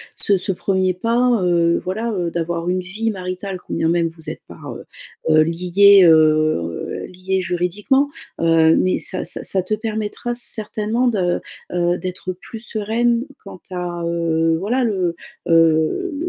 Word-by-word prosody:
ce 200 -2 +2
ce 190 - +1
premier 185 0 0
pas, 235 +3 +1
heu, 170 -1 +2
voilà, 215 +6 -3
heu, 175 -4 -2
d'avoir 170 0 -2
une 185 +1 0
vie 210 +5 -3
maritale 185 0 -5
quand - - -9
bien 160 - 0
même 170 0 +2
vous 160 -2 -9
êtes - - -7
pas, - - -13
heu, - - -8 0.4
heu, 155 0 +6
liés, 180 +4 +5
heu, 155 - +2
liés 185 +1 -3
juridiquement, 200 +11 0 0.3
heu, 165 -1 +4
mais 185 - +1
ça 185 - -1
ça - - -1
ça 190 - +2
te 185 +4 -3
permettra 220 +2 -3
certainement 225 0 0
de, 185 -7 0 0.3
heu, 175 0 +1
d'être 185 0 -5
plus 220 +5 -10
sereine 235 +2 0 0.2
quant 195 -2 -11
a, 175 -1 -4
heu, 165 -1 +1
voilà 240 +8 0
le, 185 -6 -1 0.3
heu, 165 - +3
185 Hz, 155 wpm, -20 LUFS, 170-215 Hz, 0.4 s, heu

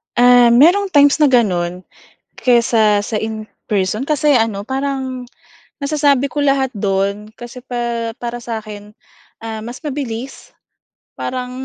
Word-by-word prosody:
Um, 245 -1 +6
mayrong 400 +4 +4
times 285 +1 +5
na 300 - +5
gano'n 180 -8 +1 0.5
kaysa 230 -4 +3
sa 210 +2 -4
in 220 0 -4 0.2
person 205 +3 0
kasi 295 0 +2
ano 220 -3 0
parang, 265 -1 -3 0.6
nasasabi 280 -2 +1
ko 295 - -3
lahat 275 -2 +1
do'n 200 -1 -2
kasi 240 +1 -10
pa 235 -2 -3
para 240 0 -6
sa 230 -2 -5
akin, 210 0 -11 0.5
ah, 220 -1 -5
mas 240 +7 -9
mabilis 265 -3 -6 0.6
parang 250 -1 -4
240 Hz, 130 wpm, -17 LUFS, 215-270 Hz, 0.6 s, Um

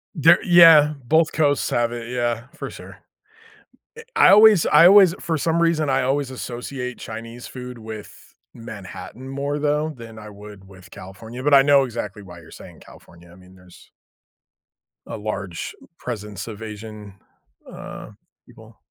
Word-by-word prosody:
There 165 +2 +5
yeah, 165 -4 +7
both 160 +1 +2
coasts 145 -3 0
have 120 0 0
it. 120 0 -7
Yeah, 120 -1 -2
for - - -7
sure. - - -13 1.0
Eh, - - -9
I - - +6
always 210 -3 +6
I 160 +4 +6
always 190 -3 +6
for 160 -2 -2
some 165 +3 0
reason, 160 -3 +1
I 135 0 +1
always 135 +1 -1
associate 125 0 -7
Chinese 115 +2 -9
food 125 -1 -9
with 110 -2 -12 0.2
Manhattan 115 +3 -10
more 140 +2 -4
though, 150 +1 -1
than 115 -2 -12
I 105 0 -11
would 100 -1 -14
with 95 -2 -17
California, 100 +6 -11
but 145 - +1
I 135 - +8
know 140 -1 +4
exactly 115 -3 -6
why 90 -2 -13
you're - - -17
saying - - -14
California. 85 0 -18
I - - -16
mean, 90 0 -18
there's 90 -1 -19 1.1
a - - -7
large 95 -5 -6 0.2
presence 105 -4 -7
of 110 -1 -9
Asian, 105 -2 -10 0.5
uh, - - -10 0.3
people. - - -18
120 Hz, 155 wpm, -21 LUFS, 105-150 Hz, 1.1 s, I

